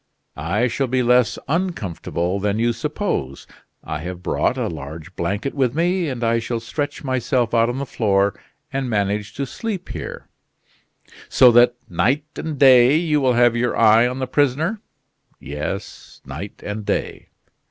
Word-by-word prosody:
"I 95 +10 0
shall 135 +3 -1
be 130 +1 +1
less 120 -2 +3
uncomfortable 100 - -2
than 100 +1 0
you 120 +1 +1
suppose; 120 - -3 0.4
I - - -4
have 90 +2 -7
brought - - 0
a - - -1
large 80 +5 -8
blanket 100 +10 -2
with 130 -3 0
me, 175 0 +1
and 125 -3 -4
I 115 0 +2
shall 115 0 -3
stretch 145 +7 -4
myself 130 -3 0
out 115 0 +3
on 125 - -3
the 140 - -3
floor 100 -5 +1 0.4
and 135 -2 -2
manage 105 -1 -1
to 140 - -2
sleep 205 - -5
here." - - -7 1.0
"So 125 -2 +6
that, 120 +1 +5
night 130 - +1
and 160 -2 -4
day, 130 0 +7
you 155 -3 +1
will 130 -2 +3
have 120 -1 +4
your 120 +1 0
eye 115 +1 +6
on 125 +1 -4
the 130 - -2
prisoner?" 145 - 0 0.6
"Yes, 75 +8 -6
night 80 +10 -8
and 105 +1 -4
day." - - -3
120 Hz, 160 wpm, -21 LUFS, 105-135 Hz, 1.0 s, day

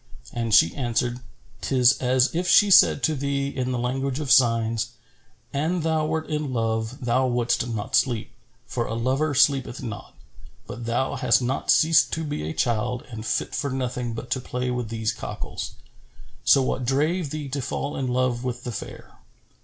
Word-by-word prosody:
And 115 -1 -2
she 95 -6 +5
answered, 120 -1 -1 0.2
" - - -29
'Tis 130 -1 +3
as 130 +1 +2
if 175 +2 -1
she 205 +2 +5
said 145 - +6
to 160 - +2
thee, 140 -1 -1
in 130 -2 -3
the 125 - -1
language 130 +3 -2
of 145 -3 -2
signs,[FN#414] 115 -1 +3 0.7
'An 170 +3 0
thou 160 -1 0
wert 160 0 -2
in 150 -3 -2
love, 115 +1 -2
thou 130 +2 +2
wouldst 120 -1 0
not 110 -3 -3
sleep, 120 -5 +1 0.3
for 120 +1 -3
a 115 - -3
lover 135 +5 0
sleepeth 135 -2 +2
not: 110 -4 -7 0.5
but 120 0 -7
thou 120 +3 -1
hast 125 0 +3
not 130 +3 -2
ceased 160 -1 +5
to 160 - -2
be 145 - -4
a - - -4
child 120 +3 -1
and 110 -1 -6
fit - - -1
for 140 - -2
nothing 125 -2 -3
but 120 - -8
to 130 - +1
play 125 0 -3
with 125 -3 -3
these 110 -1 -1
cockals. - - -6 0.7
So 135 - +5
what 130 - -2
drave 150 +6 0
thee 150 0 -5
to 140 +1 -3
fall 135 +2 -3
in 135 - -2
love 125 -1 0
with 125 0 -4
the 120 - -4
fair?' 110 - -9
125 Hz, 185 wpm, -24 LUFS, 120-140 Hz, 0.7 s, said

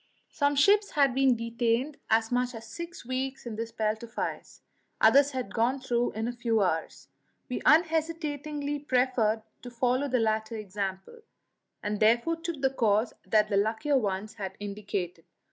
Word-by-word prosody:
Some 285 -1 +1
ships 405 +8 +4
had 280 -3 +3
been 265 -1 +4
detained 235 +4 -1
as 225 +1 +2
much 245 0 0
as 225 0 -8
six 340 +6 -8
weeks 260 +1 -3
in 230 -2 -5
this 230 +1 -4
belt 220 -1 -1
of 235 0 -11
ice; - - -5 0.4
others 280 0 +6
had 255 -7 -5
gone 245 +4 +1
through 245 -2 0
in 220 +2 -2
a - - -1
few 230 -3 +1
hours. 165 -3 -2 0.4
We 250 - -3
unhesitatingly 305 -3 +1
preferred 250 -5 +1 0.2
to 245 - -8
follow 250 +3 0
the 255 -2 +1
latter 220 0 0
example, 200 - -5 0.6
and 210 0 -2
therefore 235 +10 +3
took 330 -3 -5
the 265 - +3
course 220 -3 +1
that 215 -1 +3
the 200 - +1
luckier 225 +7 +1
ones 205 -1 -3
had 195 -4 -6
indicated. 200 -4 -4
240 Hz, 160 wpm, -28 LUFS, 215-275 Hz, 0.6 s, others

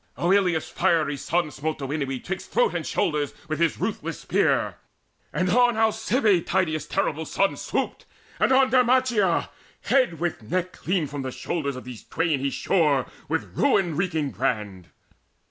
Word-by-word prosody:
Oileus' 180 -3 +2
fiery 165 -5 +1
son 160 +3 -1
smote 155 +3 -3
Derinoe 140 -1 -3
'Twixt 190 +1 -5
throat 485 -1 +2
and - - -3
shoulder 150 -2 0 0.2
with 155 0 -3
his 170 -2 +2
ruthless - - -3
spear; - - +1 0.5
And 185 +4 0
on 245 -1 +4
Alcibie 220 -2 +2
Tydeus' 165 -4 -1
terrible 160 +2 -1
son 195 +5 0
Swooped, - - -3 0.3
and - - +3
on 260 0 +4
Derimacheia: 245 -7 +3 0.3
head 250 - +2
with 175 -5 -2
neck 180 +10 -2
Clean 180 -3 -1
from 145 0 -5
the 130 - -3
shoulders 140 +1 -3
of 130 - -8
these 125 -3 -9
twain 165 -4 0
he 140 +1 0
shore 145 -3 +2 0.2
With 160 +1 -2
ruin 190 - +2
wreaking 160 -5 -1
brand. 105 -9 -2
165 Hz, 150 wpm, -25 LUFS, 145-195 Hz, 0.5 s, on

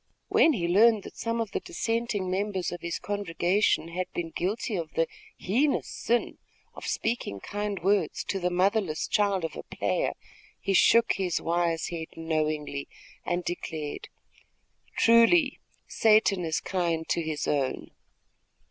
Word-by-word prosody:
When 325 - +5
he 175 -8 -1
learned 210 +3 +5
that - - -10
some 230 0 -2
of 225 -3 -2
the - - -1
dissenting 225 -1 -2
members 190 -1 -1
of 175 - -6
his 170 0 -3
congregation 195 -3 0
had 180 +2 -4
been 165 -1 -4
guilty 205 +6 -2
of 165 -4 -4
the 165 - +3 0.3
heinous 270 +10 +1
sin 240 +1 -1 0.3
of - - -8
speaking 225 - -2
kind 205 - -4
words 195 -4 +1
to 195 - 0
the 180 -1 0
motherless 185 -2 +1
child 200 -4 +1
of 165 - -5
a - - -5
player, - - -1 0.4
he 195 - -1
shook 230 +5 +5
his 185 -3 -1
wise 170 -1 0
head 165 -2 -5
knowingly 155 -3 -2 0.4
and 175 0 -1
declared, 160 -4 -5 0.9
"Truly 245 +6 +5 0.3
Satan 215 -4 +3
is 160 -1 -1
kind 170 -4 -1
to 170 - +1
his 155 -3 -3
own." 140 -3 -1
185 Hz, 145 wpm, -27 LUFS, 165-210 Hz, 0.9 s, When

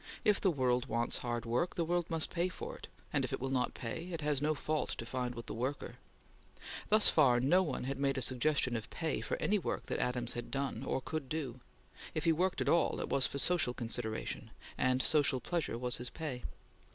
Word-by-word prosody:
If 210 -2 +4
the 195 - +4
world 130 -4 +1
wants 115 0 0
hard 120 -1 -2
work, 125 +10 0
the 170 - 0
world 175 0 0
must 165 -1 0
pay 175 +1 +1
for - - -6
it; - - -10 0.3
and, - - +2
if - - -2
it - - -2
will 135 +1 -2
not 125 -2 0
pay, 135 +8 -4
it 165 -2 -3
has 150 -2 +1
no 155 +1 +2
fault 155 +1 -1
to 115 - -5
find 125 0 -3
with 115 -1 -7
the - - -5
worker. 130 +5 -3 0.9
Thus 215 0 +6
far, 130 -6 +5
no 145 +9 +4
one 155 -9 -2
had 135 +1 -3
made 140 0 +1
a - - 0
suggestion 130 0 +2
of 110 -1 -4
pay 160 -2 -2
for - - -2
any 210 0 +2
work - - -3
that - - -2
Adams 125 -1 -1
had 120 0 -5
done 135 -3 -2
or 135 - -1
could 150 -1 -4
do; 135 -6 -3 0.6
if 155 - -1
he 165 - +5
worked 180 +3 +1
at - - 0
all, 170 -2 +3
it - - -3
was 140 -1 +2
for - - -5
social 145 -5 +3
consideration, 115 -2 -3 0.3
and 130 0 +2
social 145 -4 +4
pleasure 165 -3 -2
was 125 0 -1
his 125 0 0
pay. 145 -6 -5
135 Hz, 225 wpm, -34 LUFS, 125-160 Hz, 0.9 s, Thus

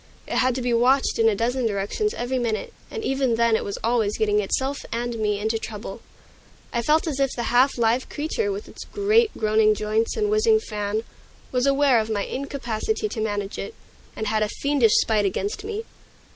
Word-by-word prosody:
It - - -3
had 255 -1 +2
to 255 - -3
be 245 -1 +1
watched 255 +3 +3
in 225 0 +5
a 215 - 0
dozen 240 +3 0
directions 210 - -1
every 250 +2 -2
minute, 225 -3 -2 0.2
and 450 -2 -5
even 265 - +1
then 230 -1 +3
it - - 0
was 200 - -4
always 225 -3 +1
getting 210 -1 +2
itself 265 +7 -1
and 235 0 -3
me 210 -1 +1
into 220 +2 -1
trouble. 215 0 -7 0.7
I 235 - +1
felt 305 +7 +2
as 295 -4 -3
if 275 -1 +3
the 240 0 -2
half 255 +3 +4
live 235 +2 +1
creature, 360 +8 -2
with 410 +2 -5
its - - -9
great, 425 +3 +2
groaning 215 0 +3
joints 215 - -1
and 420 -1 +1
whizzing 435 +1 +4
fan, 210 - -3 0.5
was 250 +1 +1
aware 275 -3 +4
of 220 0 -2
my 205 -2 0
incapacity 280 - -3
to 225 - -4
manage 205 -2 -3
it, 450 - -6 0.4
and 220 - -3
had 215 0 0
a 210 - +1
fiendish 280 -4 +2
spite 215 -2 +3
against 195 - -2
me. 435 +1 -4
235 Hz, 200 wpm, -24 LUFS, 215-280 Hz, 0.7 s, in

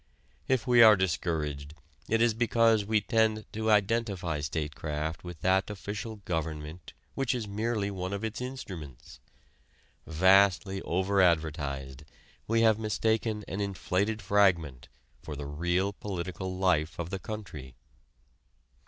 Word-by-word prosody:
If 130 -3 +1
we 120 -2 +5
are 110 -2 +9
discouraged 80 -5 -2 0.3
it 115 +1 +3
is 120 -2 +3
because 115 -2 +3
we 110 0 +2
tend 110 0 +1
to 110 +1 -1
identify 100 -6 +1
statecraft 75 +1 -4
with 90 -3 -9
that 95 +2 +2
official 105 +2 -5
government 80 -1 -4 0.2
which 135 -3 0
is 115 -4 -4
merely 105 0 -2
one 95 -1 -4
of 100 +1 -4
its 110 +2 -4
instruments. 85 - -8 0.9
Vastly 95 +3 +4
over 95 +3 +1
advertised, 75 -6 0 0.4
we 115 +1 +2
have 110 -1 +4
mistaken 110 0 -1
an 95 - -4
inflated 100 +2 -1
fragment 90 -10 +2 0.3
for 75 - -7
the 70 0 -6
real 90 +7 -1
political 95 -2 -5
life 85 -4 +1
of 85 +1 -5
the 95 - -3
country. 80 - -8
95 Hz, 125 wpm, -29 LUFS, 80-110 Hz, 0.9 s, are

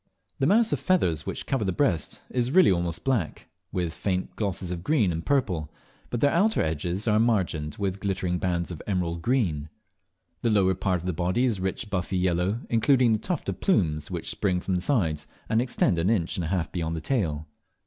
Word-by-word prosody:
The 135 - +2
mass 225 +5 +4
of - - 0
feathers 90 - +1
which - - -4
cover 135 -5 0
the 95 - 0
breast 90 - 0
is 125 -1 0
really 180 - +6
almost 85 -2 -1
black, 120 -12 -1 0.2
with 90 -4 -2
faint 95 0 -2
glosses 95 -4 -2
of 85 -1 -4
green 120 - +2
and 80 0 -3
purple, 95 - 0 0.4
but 120 - -3
their 145 - +4
outer 205 +6 +3
edges 85 +6 -2
are 105 -1 +4
margined 90 -10 +1
with 100 -1 -2
glittering 95 -3 -1
bands 90 -1 -1
of 85 - -7
emerald 85 -4 -1
green. 85 - 0 0.7
The 120 - +1
whole 105 -3 +4
lower 95 0 +3
part 95 -1 -1
of - - -10
the 90 - -1
body 90 +9 +1
is 115 -6 0
rich 95 +3 -3
buffy 95 0 -1
yellow, 90 +5 0
including 120 +1 +3
the 110 - +1
tuft 180 - -3
of - - -4
plumes 80 - +1
which - - -3
spring 90 -3 0
from 95 - -3
the 90 - +1
sides, 85 - 0 0.2
and 110 +1 +2
extend 120 -8 +1
an 85 +4 +1
inch 95 -7 +1
and 90 - -2
a - - -3
half 85 -1 -1
beyond 85 -2 -2
the 80 - -4
tail. 80 - -1
95 Hz, 210 wpm, -26 LUFS, 85-115 Hz, 0.7 s, really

